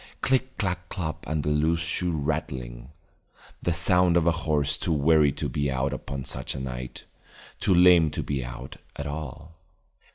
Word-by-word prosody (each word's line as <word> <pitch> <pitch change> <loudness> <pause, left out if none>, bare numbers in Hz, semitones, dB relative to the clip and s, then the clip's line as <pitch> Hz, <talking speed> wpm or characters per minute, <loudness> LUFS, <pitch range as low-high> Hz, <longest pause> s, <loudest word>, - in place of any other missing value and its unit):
Click 130 0 +1
clack 90 -3 -2
clop 80 -4 -4
and 75 -2 -1
a - - +1
loose 80 +3 +2
shoe 90 +1 -1
rattling, 70 -6 -3 0.7
the 85 - 0
sound 85 +2 +3
of 85 - +2
a 85 - +5
horse 75 -3 0
too - - -1
weary 75 -1 +4
to - - -3
be 70 -1 -1
out 65 +1 -1
upon 70 0 -5
such 65 +2 -2
a - - -4
night, 65 -1 -6 0.6
too 95 - +3
lame 90 -2 +7
to 75 - -4
be 70 -3 -2
out - - -8 0.2
at 70 - -5
all. 80 +2 -7
75 Hz, 170 wpm, -26 LUFS, 70-85 Hz, 0.7 s, lame